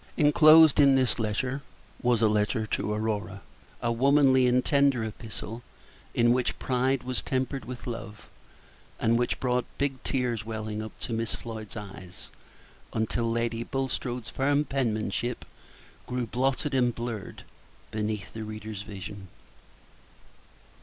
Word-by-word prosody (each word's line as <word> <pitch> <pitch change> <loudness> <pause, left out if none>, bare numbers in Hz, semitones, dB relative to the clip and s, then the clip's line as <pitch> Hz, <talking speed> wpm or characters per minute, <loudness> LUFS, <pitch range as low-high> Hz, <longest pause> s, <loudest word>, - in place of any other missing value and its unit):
Inclosed 155 0 +7
in 140 -2 +7
this 130 -2 +3 0.9
was 120 -2 +2
a - - +6
letter 105 +2 +1
to 105 - -2
Aurora, 105 -2 -2 0.4
a 120 - +2
womanly 130 +1 +4
and 125 +1 +3
tender 140 -4 +3
epistle, 110 +1 -6 0.5
in 120 0 +5
which 125 -1 0
pride 130 +1 0
was 130 -1 -1
tempered 130 0 -2
with 125 0 -7
love, 110 -3 -7 0.7
and 115 +1 +3
which 120 - 0
brought 125 -1 +1
big 135 -2 -1
tears 125 -5 -1
welling 110 -1 -4
up 110 - -9
to 115 - -3
Miss 115 -1 -1
Floyd's 110 -2 -7
eyes, 95 -3 -9 0.6
until 115 +1 0
Lady 115 0 -1
Bulstrode's 125 -2 -3
firm 145 +2 +1
penmanship 120 -3 -1 0.6
grew 125 -1 -2
blotted 135 +5 0
and 125 -3 +2
blurred 115 -4 -5 0.5
beneath 105 -1 -3
the 110 - -5
reader's 110 -1 -6
vision. 100 -1 -8
120 Hz, 125 wpm, -28 LUFS, 110-130 Hz, 0.9 s, Inclosed